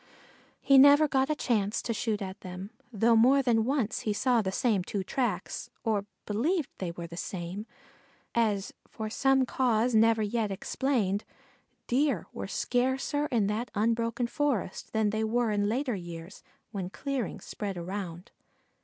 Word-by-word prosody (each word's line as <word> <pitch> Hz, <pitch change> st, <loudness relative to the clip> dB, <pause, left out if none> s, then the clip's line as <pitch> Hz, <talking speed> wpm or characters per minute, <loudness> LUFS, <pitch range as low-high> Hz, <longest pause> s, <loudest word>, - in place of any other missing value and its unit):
He 275 Hz, -1 st, +7 dB
never 285 Hz, +2 st, +8 dB
again 305 Hz, -, +2 dB
got 270 Hz, -, 0 dB
a 305 Hz, -, +1 dB
chance 215 Hz, -7 st, 0 dB
to 230 Hz, -, -1 dB
shoot 215 Hz, -2 st, -1 dB
at 190 Hz, 0 st, -7 dB
them, 185 Hz, +3 st, -7 dB, 0.2 s
though 230 Hz, +1 st, +3 dB
more 260 Hz, +5 st, +5 dB
than 225 Hz, -3 st, +3 dB
once 255 Hz, -4 st, 0 dB
he 210 Hz, -, -1 dB
saw 245 Hz, +2 st, +2 dB
the 190 Hz, -2 st, -2 dB
same 205 Hz, -2 st, +1 dB
two 195 Hz, +1 st, -3 dB
tracks, 205 Hz, -4 st, -2 dB
or 205 Hz, -3 st, 0 dB, 0.2 s
believed 290 Hz, -, 0 dB
they 185 Hz, -, -2 dB
were 170 Hz, 0 st, -6 dB
the 170 Hz, 0 st, -9 dB
same, 185 Hz, +3 st, -5 dB, 0.7 s
as 210 Hz, -4 st, +1 dB
for 215 Hz, -1 st, -6 dB
some 270 Hz, +2 st, +3 dB
cause 245 Hz, -2 st, +1 dB
never 225 Hz, 0 st, +4 dB
yet 215 Hz, 0 st, 0 dB
explained, 205 Hz, 0 st, -1 dB, 0.6 s
Deer 260 Hz, -, +1 dB
were 100 Hz, -, -5 dB
scarcer 260 Hz, -, 0 dB
in 230 Hz, -7 st, +1 dB
that 215 Hz, +4 st, -2 dB
unbroken 230 Hz, +3 st, +1 dB
forest 260 Hz, -, -2 dB
than 220 Hz, -2 st, +1 dB
they 220 Hz, +1 st, -1 dB
were 230 Hz, +1 st, +1 dB
in 205 Hz, 0 st, +1 dB
later 255 Hz, +2 st, 0 dB
years 175 Hz, -1 st, -8 dB, 0.3 s
when 190 Hz, -4 st, -4 dB
clearings 275 Hz, +2 st, -4 dB
spread 200 Hz, -3 st, -4 dB
around. 180 Hz, 0 st, -6 dB
220 Hz, 160 wpm, -29 LUFS, 200-250 Hz, 0.7 s, never